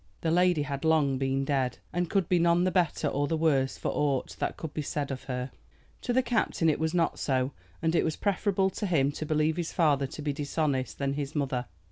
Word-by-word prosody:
The 165 - 0
lady 175 -3 +3
had 140 -1 -4
long 150 -5 +3
been 135 0 0
dead, 135 -4 0 0.2
and 175 0 -1
could 195 -4 +1
be 180 -1 +3
none 170 +1 +4
the 185 - +2
better 180 -3 +1
or 145 +1 0
the 160 - 0
worse 140 -5 +2
for - - -2
aught 140 -3 0
that - - -2
could 160 -2 -6
be 155 - -2
said 145 -1 -3
of 130 - -6
her. 125 0 -4 0.5
To 245 - -2
the 255 +2 +3
captain 225 -8 +1
it - - -3
was 160 +2 0
not 170 -2 +1
so, 130 -1 0 0.3
and 160 0 +2
it 170 - +3
was 160 - -1
preferable 195 -1 +1
to 205 - -3
him 145 -6 +2
to 155 +1 -5
believe 155 +1 +1
his 170 -2 -2
father 145 -5 +2
to 150 - -8
be 145 -1 -1
dishonest 140 -2 -1
than 140 0 -1
his 145 +1 -4
mother. 130 -4 -1
155 Hz, 230 wpm, -28 LUFS, 140-170 Hz, 0.5 s, none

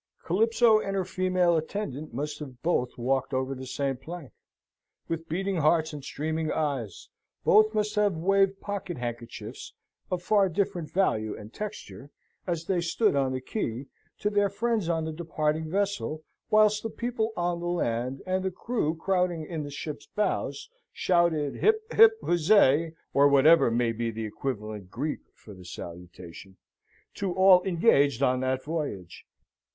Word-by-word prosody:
Calypso 225 +4 +4
and 195 -2 -3
her 190 -2 0
female 185 -1 +1
attendant 155 -3 -4
must 145 +5 -4
have 135 -5 -10
both 145 -7 0
walked 130 +2 0
over 130 +1 -1
the 130 0 -8
same 135 +1 -1
plank, 165 0 -9 0.8
with 165 0 -4
beating 190 +3 -1
hearts 160 0 +2
and 145 -2 -7
streaming 155 +3 -2
eyes; 135 - -3 0.3
both 215 +1 +5
must 210 0 0
have 210 -3 +2
waved 195 +3 +2
pocket 200 -4 -5
handkerchiefs 120 -1 -7 0.4
(of 180 -1 -2
far 200 -1 +3
different 180 -2 -2
value 110 - 0
and 105 +2 -11
texture), 205 -9 -7 0.4
as 170 -2 -2
they 180 -1 0
stood 185 +3 +1
on 135 -2 +1
the 130 - -2
quay, 130 - -4 0.3
to 210 - -1
their 205 -1 +2
friends 215 -2 -1
on 165 -2 0
the 160 - -3
departing 155 -1 -2
vessel, 195 -4 -2 0.3
whilst 215 -1 +4
the 225 - -4
people 230 -1 -2
on 175 0 -1
the 175 - -4
land, 130 -6 -2
and 185 0 -1
the 190 - 0
crew 185 -4 -2
crowding 180 -2 0
in 160 -1 -4
the 145 - -6
ship's 145 +1 -7
bows, 190 -9 -2 0.2
shouted 170 -5 +1
hip, 435 0 +3
hip, 450 0 +8
huzzay 165 -3 +4 0.2
(or 140 +1 +6
whatever 145 +2 +6
may 115 0 +1
be 115 +1 -2
the 110 0 -4
equivalent 105 -4 -5
Greek 145 +9 -3 0.2
for 105 - -13
the 95 -1 -13
salutation) 90 +1 -10 0.6
to 195 -2 -2
all 190 -1 +7
engaged 145 - +3
on 130 -1 +2
that 130 0 -1
voyage. 145 - -5
160 Hz, 155 wpm, -27 LUFS, 135-195 Hz, 0.8 s, hip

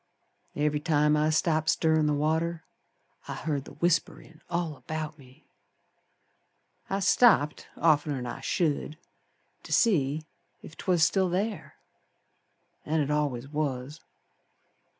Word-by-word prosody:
Every 150 0 0
time 150 -1 +2
I 150 +1 +2
stopped 155 0 +1
stirrin' 160 -1 +2
the 150 - +1
water 160 +2 0 0.6
I - - -4
heerd 145 -4 -3
the - - -11
whisperin' 165 -2 -1
all 170 -3 -2
about 155 +1 -6
me. 130 -1 -19 1.4
I 195 - -1
stopped 185 -7 +4
oftener'n 145 -5 +2
I 120 +2 -6
should 155 0 -1 0.6
To - - -12
see 155 - +2 0.4
ef 160 - -11
'twas 175 -4 +1
still 190 +3 +2
ther, 200 +4 -3 1.1
An' 160 +1 0
it 145 -1 0
al'ays 140 -4 -1
was. 145 0 -3
155 Hz, 115 wpm, -28 LUFS, 145-165 Hz, 1.4 s, stopped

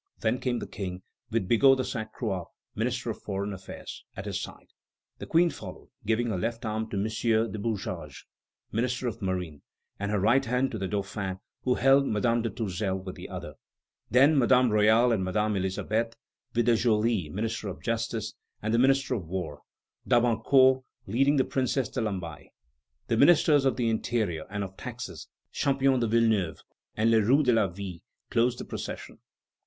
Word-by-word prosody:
Then 115 +3 +1
came 125 -2 -1
the - - -4
King, 95 -2 -6 0.3
with 115 -4 -1
Bigot 135 +5 +5
de 130 - 0
Sainte 110 -3 -4
Croix, 95 -8 -3 0.3
Minister 120 +1 -1
of - - -9
Foreign 100 0 -3
Affairs, 95 0 -9
at - - -5
his - - -3
side; - - -9 0.5
the - - -7
Queen 170 +1 +4
followed, - - -10 0.2
giving 115 +1 +1
her 95 - -1
left 115 +3 -3
arm 110 0 -2
to 105 - -3
M. 100 - +1 0.5
du 110 - -5
Bouchage, 95 - -4 0.5
Minister 125 +3 -1
of 115 0 -4
Marine, 90 -6 -3 0.4
and 100 0 -2
her 105 -1 +1
right 120 +8 +4
hand 125 +1 0
to 110 - -4
the 95 - -2
Dauphin, 95 -1 -3 0.2
who 125 -1 +1
held 135 +2 +4
Madame 115 +3 +1
de 115 - -1
Tourzel 95 -3 -2
with 95 -1 -7
the - - -9
other; - - -7 0.6
then 140 +4 +5
Madame 125 -1 +4
Royale 110 +3 +5
and 105 -5 +1
Madame 105 +3 0
Elisabeth, 110 +5 -1 0.4
with 120 -1 +2
De 120 -1 +5
Joly, 110 -6 +1
Minister 110 +4 -3
of 95 - -7
Justice; 115 -1 -2 0.3
the 110 +2 +2
Minister 135 +1 +3
of 95 -9 -3
War, 80 -5 -4 0.5
D'Abancourt, 130 +2 +4 0.2
leading 135 +8 +2
the 130 - +3
Princess 130 -1 0
de 130 - -3
Lamballe. 90 -9 -4 0.6
The 115 - 0
Ministers 145 -1 +5
of 135 - +3
the 120 -2 0
Interior 110 -7 -1
and 100 0 -3
of 95 -1 -7
Taxes, - - -7 0.2
Champion 135 -2 +2
de 120 - +1
Villeneuve 110 -7 +1 0.3
and 110 +1 +3
Le 110 -1 +5
Roux 135 +8 +4
de 125 -3 +3
la 110 -3 +3
Ville, 90 -1 -7 0.3
closed 120 +1 +2
the - - -6
procession. - - -7
115 Hz, 175 wpm, -28 LUFS, 100-125 Hz, 0.6 s, Bigot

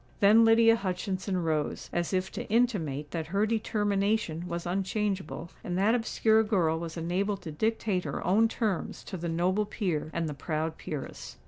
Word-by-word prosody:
Then 210 +3 +7
Lydia 225 0 +6
Hutchinson 190 -1 -2
rose, 155 -2 -1
as 175 -1 -1
if 185 0 -1
to - - -6
intimate 170 - 0
that 160 -2 -3
her 200 +5 +1
determination 205 -5 0
was 170 0 -4
unchangeable; 190 -2 -2
and 175 0 -2
that 205 +4 +3
obscure 225 -2 +3
girl 180 -7 +1
was 165 0 -6
enabled 185 +4 -1
to 160 - -5
dictate 210 +1 0
her - - -4
own 215 +5 +4
terms 220 -4 -2
to 195 - -7
the 170 0 -3
noble 185 +5 +1
peer 175 -9 -2
and 165 0 -1
the 150 - -3
proud 155 +2 -3
peeress. 150 -4 -6
185 Hz, 165 wpm, -29 LUFS, 165-215 Hz, -, Then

